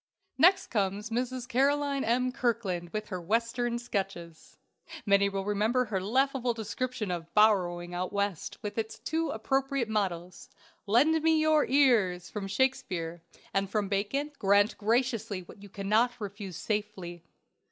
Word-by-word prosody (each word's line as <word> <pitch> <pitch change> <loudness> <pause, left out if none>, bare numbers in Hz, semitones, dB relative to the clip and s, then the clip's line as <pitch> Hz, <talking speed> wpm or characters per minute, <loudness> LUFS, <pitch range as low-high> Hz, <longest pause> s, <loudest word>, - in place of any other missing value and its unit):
Next 370 +4 +6
comes 205 0 -1
Mrs. 250 +1 -2
Caroline 280 +2 +1
M. 250 +3 +1
Kirkland 220 -9 -1
with 215 +3 -5
her 185 -3 -4
Western 230 +5 0
sketches. 195 -8 -5 0.5
Many 200 -1 +4
will 195 -1 -3
remember 215 +5 +1
her 200 -4 -2
laughable 255 +3 +1
description 225 -1 -3
of 170 -1 -5
"Borrowing 180 -5 +3
Out 180 +1 -3
West," 200 -4 -2
with 210 +1 -3
its 220 0 -4
two 325 +1 -2
appropriate 270 +2 0
mottoes: 185 -5 -3 0.4
"Lend 305 +10 +4
me 320 0 +3
your 310 -1 +3
ears," 230 -11 +3
from 205 -2 -4
Shakespeare, 195 -8 -1 0.3
and 195 0 0
from 205 -1 -1
Bacon: 215 +9 -1
"Grant 205 +2 +3
graciously 225 -3 0
what 185 +3 -14
you 205 - -11
cannot 215 +6 +1
refuse 200 -3 -6
safely." 205 -5 -4
215 Hz, 140 wpm, -29 LUFS, 195-250 Hz, 0.5 s, Next